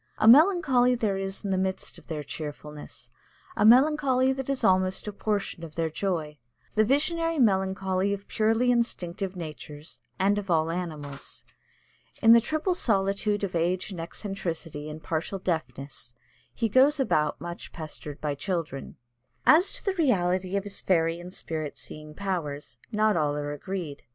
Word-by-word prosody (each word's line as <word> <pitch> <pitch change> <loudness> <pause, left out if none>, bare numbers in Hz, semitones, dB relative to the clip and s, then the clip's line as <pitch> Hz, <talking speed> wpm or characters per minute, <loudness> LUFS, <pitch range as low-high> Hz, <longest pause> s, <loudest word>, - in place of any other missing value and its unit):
A 215 - +2
melancholy 270 - +6
there 210 -5 0
is 195 +1 -4
in 195 - -1
the 190 - +1
midst 190 0 -2
of - - -22
their 155 -3 -4
cheerfulness 150 0 -8 0.4
a - - +1
melancholy 260 +2 +5
that 265 0 -5
is 275 -1 -1
almost 185 +1 +2
a 210 - -4
portion 200 -4 -2
of 160 -2 -9
their 165 -1 -1
joy, 160 -5 -2 0.3
the 215 - +4
visionary 330 +7 +1
melancholy 190 -4 +1
of 200 0 -4
purely 225 +3 +2
instinctive 195 -5 -1
natures 155 -2 -8 0.2
and 200 +2 +2
of 195 -2 -8
all 165 -1 +2
animals. 155 -5 -5 0.8
In 225 - +6
the 235 - +7
triple 310 - 0
solitude 205 - +1
of 195 - -2
age 175 +4 0
and 175 -3 -5
eccentricity 165 -4 -5
and 155 +1 -8
partial 165 +4 -2
deafness 135 -8 -4 0.4
he 230 - -1
goes 265 +7 +4
about 150 - +1
much 170 +2 -7
pestered 155 -2 -7
by 150 -1 -1
children. 155 -3 -4 0.5
As 355 +6 +6
to - - -5
the 390 - +1
reality 190 - +1
of 200 - -1
his 200 -1 -4
fairy 165 -2 +1
and 175 +1 -9
spirit 155 -5 -4
seeing 150 0 -10
powers, 150 -10 -4
not 215 0 +2
all 150 -3 +1
are 145 0 -3
agreed. 155 -1 -5
190 Hz, 160 wpm, -27 LUFS, 160-220 Hz, 0.8 s, the